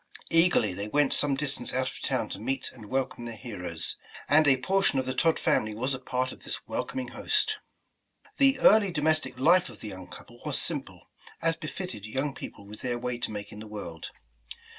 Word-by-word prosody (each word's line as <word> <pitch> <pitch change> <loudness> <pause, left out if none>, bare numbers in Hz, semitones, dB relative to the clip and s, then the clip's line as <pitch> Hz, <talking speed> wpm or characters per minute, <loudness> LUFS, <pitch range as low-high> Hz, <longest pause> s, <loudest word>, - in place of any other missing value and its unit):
Eagerly, 165 - +5
they 100 +3 -4
went 145 +4 +3
some 145 -2 +3
distance 135 -3 -1
out 130 0 +1
of - - -7
town - - 0
to - - -5
meet 130 +4 -2
and 110 -5 -12
welcome 130 -2 -1
their 115 -1 -5
heroes, 90 -8 -5 0.3
and 155 +2 +5
a 135 -2 +6
portion 190 +3 +2
of 130 - +1
the 130 - -1
Todd 160 +5 +3
family 110 -1 +1
was 130 +5 0
a 130 - -3
part 130 0 -1
of - - -12
this - - -5
welcoming 130 -2 -3
host. 430 - 0 0.8
The 275 -1 +7
early 210 -2 +7
domestic 155 -4 0
life 170 +5 +5
of 115 - -12
the 110 - -6
young 95 -2 -8
couple - - -13
was - - -1
sim - - -2
ple, - - -16 0.4
as 165 0 +2
befitted 155 - -6
young 135 +5 -1
people 100 - -9
with 105 +1 -10
their 120 -1 -1
way 125 0 -3
to - - -1
make 105 -1 -6
in 105 - -9
the 110 - -8
world. 100 -6 -7
130 Hz, 205 wpm, -28 LUFS, 110-155 Hz, 0.8 s, The